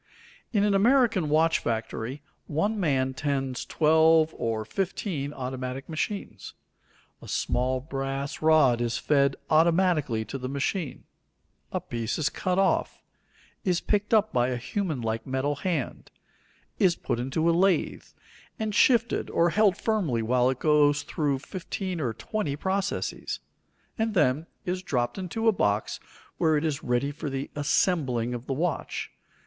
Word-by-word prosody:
In 205 -3 +2
an 205 -1 +3
American 220 - +3
watch 160 +2 +3
factory 115 +4 -3 0.2
one 205 +9 0
man 135 -7 +1
tends 135 -2 -2
twelve 160 0 +4
or 110 -2 -2
fifteen 170 - -3
automatic 130 0 -5
machines. 180 +5 -4 0.7
A - - -11
small 130 +1 0
brass 135 0 -4
rod 155 -7 +4
is 120 -1 0
fed 140 -2 +2 0.2
automatically 160 -7 +3
to 135 - -6
the 130 0 -4
machine; 140 +2 -2 0.7
a - - -1
piece 115 -1 -3
is 155 - +1
cut 180 0 -2
off, 195 0 +1 0.6
is 180 -2 +1
picked 210 0 -1
up 215 -1 +3
by 120 -1 +3
a 125 -1 -1
human 155 - -3
like 115 +1 -3
metal 135 +2 -1
hand; 160 -6 -3 0.7
is 180 -3 +4
put 120 - -3
into 135 +6 0
a 170 - +4
lathe, 185 +2 +1 0.5
and 220 -1 -2
shifted 235 0 +3
or 170 0 +2
held 205 -3 +3
firmly 175 - 0
while 125 +2 +3
it 130 - -1
goes 150 0 +3
through 145 -3 -1
fifteen 185 +3 -5
or 125 -5 0
twenty 145 - -3
processes; 190 +5 -2 0.6
and 220 -1 0
then 150 -1 +2 0.2
is 185 +1 -2
dropped 125 -1 -1
into 205 +5 -2
a - - +7
box 105 - 0 0.4
where 160 -2 +3
it 150 - -1
is 150 -3 -1
ready 125 +3 0
for 150 0 -5
the 135 0 -4
"assembling" 140 -5 +1
of 120 +1 -6
the 135 - -1
watch. 165 +4 -2
150 Hz, 145 wpm, -27 LUFS, 130-185 Hz, 0.7 s, a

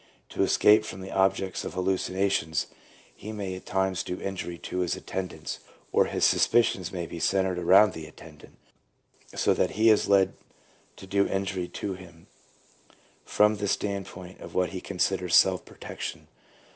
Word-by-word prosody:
To - - -3
escape 105 +1 +5
from 95 -3 -8
the 95 - -8
objects 95 -1 +1
of - - -6
hallucinations, 95 -3 0 0.5
he 110 - -8
may 100 -3 -4
at 95 - -9
times 95 -2 0
do 90 - -5
injury 95 -3 -5
to 90 - -5
his 90 -1 0
attendants, 95 -1 -5 0.3
or - - +4
his - - +1
suspicions 95 -7 +3
may 90 -2 -4
be 85 - -8
centred 95 0 +1
around 95 +3 +6
the 80 -1 -8
attendant, 75 0 -15 0.8
so - - +3
that - - 0
he 110 +1 +6
is 105 - +3
led 95 -1 +4 0.6
to - - -11
do 100 +1 +1
injury 95 -2 -2
to 100 - -5
him 90 -3 -13 1.0
from 105 0 +3
the 100 0 -2
standpoint 95 -2 -4
of - - -11
what 90 -1 +2
he 95 -1 -6
considers 90 -1 0
self - - +4
protection. - - -7
95 Hz, 160 wpm, -27 LUFS, 90-100 Hz, 1.0 s, around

